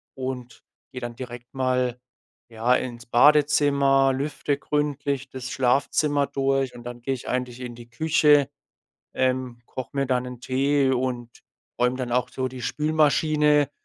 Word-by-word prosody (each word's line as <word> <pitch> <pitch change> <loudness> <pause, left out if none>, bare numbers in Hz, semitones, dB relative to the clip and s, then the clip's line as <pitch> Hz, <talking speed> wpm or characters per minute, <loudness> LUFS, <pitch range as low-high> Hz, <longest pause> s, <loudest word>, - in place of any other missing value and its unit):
und 130 -2 -6 0.3
gehe 125 - -7
dann 120 -1 -5
direkt 120 0 -9
mal, 125 -2 0 0.5
ja, 115 +2 +2
ins 120 -2 -4
Badezimmer, 140 +1 +4
lüfte 140 +1 -2
gründlich 140 -2 -2
das 130 -1 -7
Schlafzimmer 140 +3 +1
durch. 135 -1 0
Und 120 - -10
dann 120 0 -8
gehe 135 +3 -1
ich 130 - -7
eigentlich 125 0 -3
in 120 -1 -6
die 120 0 -13
Küche, 150 +1 +3 0.7
ähm, 130 -2 -1
koche 130 -3 -7
mir 140 -1 0
dann 125 -1 0
'n 125 -1 -8
Tee 135 +2 +1
und 125 -2 -2 0.5
räume 125 +1 +2
dann 125 -2 -4
auch 125 0 +1
so 130 -1 -3
die 130 0 -9
Spülmaschine, 150 -1 +2
130 Hz, 145 wpm, -24 LUFS, 125-140 Hz, 0.7 s, Badezimmer